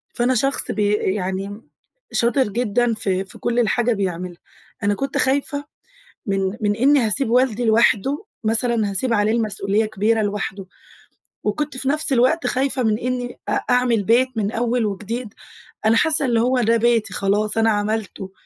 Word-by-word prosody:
فأنا 245 +2 +1
شخص 275 +4 0
بي 210 -1 +1
يعني 195 +1 -2 0.5
شاطر 240 +3 +2
جدًا 235 +2 0
في 195 -3 -2
في 190 - -14
كُلّ 240 0 0
الحاجة 240 +1 +2
بيعملها. 180 -3 -4 0.4
أنا 205 0 +2
كنت 275 +5 -3
خايفة 285 +2 0 0.6
من 195 0 -1
من 205 -1 +1
إني 275 +6 +4
هاسيب 230 +2 0
والدي 245 -1 +2
لوحده، 230 - +2 0.2
مثلًا 225 -1 +1
هاسيب 230 +5 0
عليه 210 -1 +2
المسؤولية 215 -2 0
كبيرة 215 +1 0
لوحده، 200 -1 -3 0.8
وكنت 275 +7 -2
في 265 +1 -2
نَفْس 305 +1 0
الوقت 260 +7 +2
خايفة 265 0 0
من 215 -2 +1
إني 245 0 -3
أ - - 0 0.2
أعمل 245 -4 +2
بيت 240 +5 +3
من 210 -1 -1
أول 235 0 0
وجديد. 210 +3 -5 0.5
أنا 220 +1 +4
حاسة 305 +3 +2
إن 240 -2 +1
هو 250 +2 +2
ده 230 0 +3
بيتي 230 -1 +1
خلاص 205 +2 0
أنا 225 0 +4
عملته، 205 -2 -3
225 Hz, 155 wpm, -21 LUFS, 205-250 Hz, 0.8 s, إني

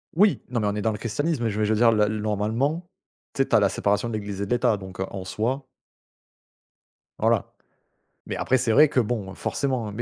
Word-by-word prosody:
Oui, 200 +3 +4
non 120 -2 -1
mais 105 - 0
on 105 - -1
est 105 - -2
dans 110 - +2
le 105 - -4
christianisme, 145 +5 -1
mais 115 - +1
je 105 - -4
veux 105 - +2
je 110 - +2
veux 110 - 0
dire 115 -1 +6
là, 105 -2 +3
normalement, 110 - -1 0.5
tu 135 - 0
sais? 135 - +2
Tu - - +3
as - - +7
la 100 - +4
séparation 105 +4 0
de - - -5
l’Église 100 -2 -4
et - - 0
de 100 - -9
l’État 120 -3 +2
donc 95 -2 -10
heu, 95 - 0
en 95 -2 -6
soi 125 +8 -2 1.5
Voilà, - - +1 0.7
mais - - -4
après 130 - +2
c'est 120 -2 0
vrai 150 +6 +6
que 130 - +1
bon, 105 -4 -2
forcément 130 -3 -2
mais 105 - -9
110 Hz, 240 wpm, -25 LUFS, 105-130 Hz, 1.5 s, as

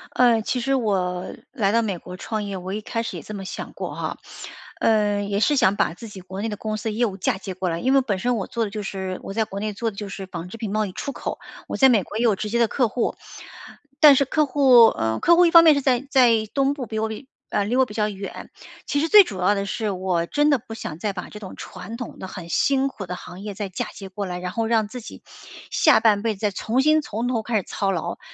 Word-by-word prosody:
呃， 240 -3 +4
其 250 +3 -2
实 270 +3 +1
我 185 -6 -1 0.2
来 205 -7 +1
到 230 +1 +3
美 200 -5 -2
国 180 +2 -10
创 215 +1 -3
业， 200 -2 -4
我 185 +2 -6
一 215 - -3
开 230 +2 -3
始 - - -5
也 - - -9
这 215 - -8
么 195 -2 -6
想 - - -7
过 - - -6
哈， - - -4 0.6
呃， 205 -2 +2
也 200 0 -1
是 290 +6 +3
想 200 -6 +3
把 - - +1
自 225 +5 -10
己 195 -3 -10
国 190 +2 -7
内 225 - -2
的 210 - -5
公 215 0 -3
司 220 +1 -3
业 235 +3 +1
务 195 -3 -4
嫁 190 - 0
接 190 -1 -6
过 185 -1 -2
来， 165 0 -2
因 260 +2 +1
为 270 - +5
本 210 -7 -1
身 245 +2 0
我 195 - -3
做 230 -1 -2
的 - - -5
就 210 0 -4
是 190 -1 -4
我 195 - -6
在 220 0 +1
国 200 -2 -6
内 215 0 -3
做 225 +2 -2
的 200 - -17
就 205 -2 -5
是 195 0 -6
纺 175 -2 -7
织 230 - -9
品 215 -3 -4
贸 215 0 +1
易 190 - -6
出 280 - -4
口， - - -5 0.3
我 - - -4
在 265 -1 +6
美 220 -6 +3
国 215 - -7
也 235 - 0
有 220 -4 +4
直 210 +2 -4
接 235 +2 0
的 230 - +4
客 245 +1 +1
户。 235 +2 -1 0.9
但 295 -3 +9
是 275 - +4
客 305 +3 +1
户 260 -4 +6
呃， 110 - -1
客 340 - +5
户 355 +1 +6
一 335 - +3
方 335 -1 +9
面 315 -2 +7
是 280 - 0
在 260 0 +1
在 235 -5 +4
东 275 0 +2
部， 270 -4 -5
比 220 - -5
我 220 0 -1 0.4
呃， 200 - 0
离 235 - -1
我 260 - +5
比 210 - -10
较 210 -1 +1
远， 195 -1 -8 0.3
其 285 - 0
实 325 - 0
最 415 -2 +9
主 195 - -7
要 205 +3 +3
的 200 0 -2
是 215 +2 -2
我 180 -3 -1
真 295 0 +2
的 275 - +3
不 225 -1 -9
想 165 -7 -7
再 205 0 -2
把 180 - -7
这 210 - -10
种 190 -3 -9
传 230 +2 -8
统 245 - -8
的 190 - -6
很 180 -2 -8
辛 270 +9 +2
苦 200 -8 -7
的 180 - -4
行 180 +1 -10
业 205 -2 -6
再 205 -2 -4
嫁 180 - -4
接 195 - -9
过 195 +1 -5
来， 180 0 -4
然 180 0 -4
后 225 +1 -1
让 220 -2 +2
自 245 +3 -8
己 - - -11 0.5
下 - - +5
半 210 -3 +3
辈 220 -2 -1
子 - - -18
再 210 -1 +1
重 225 +6 -1
新 310 0 +4
从 235 -2 -3
头 235 -3 0
开 225 +1 -3
始 200 - +2
操 195 -1 -2
劳。 170 -4 -3
215 Hz, 305 characters per minute, -23 LUFS, 195-245 Hz, 0.9 s, 但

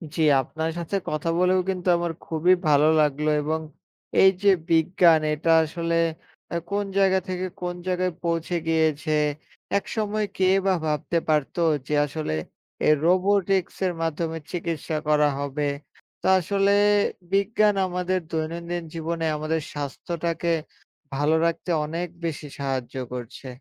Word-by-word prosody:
জ্বী, 160 - +1 0.2
আপনার 160 +5 -3
সাথে 170 +3 -3
কথা 155 +2 -2
বলেও 180 +1 +3
কিন্তু 185 -1 -3
আমার 170 -1 -1
খুবই 165 +3 +3
ভালো 150 0 +5
লাগলো। 150 +1 +1
এবং 155 +2 -1 0.6
এই 190 - +8
যে 200 - +6 0.2
বিজ্ঞান, 165 0 +4
এটা 160 +2 +1
আসলে 165 +1 -2 0.5
অ্যা 170 - -2
কোনো 200 0 -1
জায়গা 190 -1 +4
থেকে 185 0 -2 0.2
কোনো 175 0 -4
জায়গায় 185 -1 0
পৌঁছে 170 +1 -1
গিয়েছে। 160 -1 +1 0.6
একসময় 215 +1 -2
কে 190 - +2 0.2
বা 195 - +4
ভাবতে 155 +2 -1
পারত 150 -3 +1 0.3
যে - - -2
আসলে 150 - -4 0.5
এ - - +6 0.2
robotics 190 +1 +2
এর 180 - 0
মাধ্যমে 165 0 -2
চিকিৎসা 165 -3 -3
করা 150 -1 +4
হবে? 140 +1 -3 0.6
তো - - -9
আসলে 195 +2 +1 0.6
বিজ্ঞান 205 +1 +3
আমাদের 180 +1 -1
দৈনন্দিন 170 +2 -3
জীবনে 165 0 -3
আমাদের 155 +1 -1
স্বাস্থ্যটাকে 165 +4 -3 0.7
ভালো 145 +3 +2
রাখতে 170 +2 -2 0.2
অনেক 165 +3 -3 0.2
বেশি 155 -2 -4
সাহায্য 130 -3 -3 0.2
করছে। 125 +2 -7
165 Hz, 130 wpm, -24 LUFS, 155-180 Hz, 0.7 s, এই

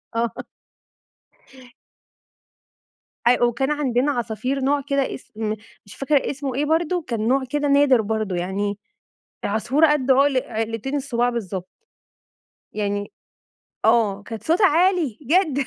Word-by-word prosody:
آه. 230 0 +1 3.0
أيوه، 245 0 +4
وكان 265 +5 -1
عندنا 280 -1 +1
عصافير 250 +2 -2
نوع 280 +2 +1
كده 275 0 -1
إسم 215 -3 -5 0.3
مش 200 - -13
فاكرة 275 +1 +1
إسمه 275 -2 -4
إيه 290 +2 0
برضه، 335 +3 +1
كان 225 -2 -2
نوع 265 +1 +2
كده 290 +1 0
نادر 280 -4 +5
برضه 215 -3 -2
يعني، 195 +3 -2 0.7
العصفورة 255 +9 +2
قد 270 -3 0
عُقل 270 -1 +4
عِقلتين 225 +4 -3
الصُباع 245 -3 0
بالضبط، 190 -6 -5 1.1
يعني 205 -1 -2 0.7
آه، 215 -3 +3
كانت 225 0 -8
صوتها 360 +5 +4
عالي 335 - +2
جدًا 295 -2 +2
255 Hz, 120 wpm, -22 LUFS, 220-285 Hz, 3.0 s, نادر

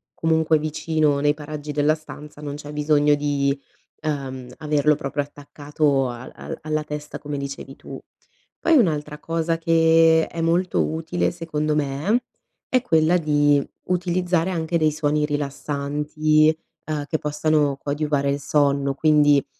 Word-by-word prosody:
comunque 160 -1 +2
vicino 155 -1 0
nei 145 +1 +2
paraggi 150 0 -6
della 150 +1 +2
stanza, 150 -1 -10
non 145 -1 -5
c'è 145 0 -9
bisogno 150 0 +3
di, 145 -1 +1 0.5
uhm, 135 -5 -4
averlo 150 -1 +2
proprio 145 0 -2
attaccato 145 -1 -1
al 120 +1 -8
al - - -7
alla 155 0 -2
testa 150 0 -6
come 145 -1 -5
dicevi 140 -1 -6
tu. - - -9 0.6
Poi, 330 -2 +4
un'altra 150 - 0
cosa 165 +1 -1
che 165 0 +4
è 165 - -5
molto 170 +2 +1
utile 160 +2 -1
secondo 155 -3 -2
me 150 - 0 0.4
è 255 -1 +2
quella 165 -5 +3
di 145 -3 +3 0.3
utilizzare 180 -1 0
anche 170 -1 -1
dei 155 -1 +3
suoni 150 0 0
rilassanti, 150 +2 0 0.3
uhm, 150 -2 -2
che 155 +1 -2
possano 150 -1 +1
coadiuvare 145 -1 -1
il 140 - -1
sonno, 140 -1 +1
quindi 145 -2 +4
150 Hz, 140 wpm, -23 LUFS, 145-160 Hz, 0.6 s, Poi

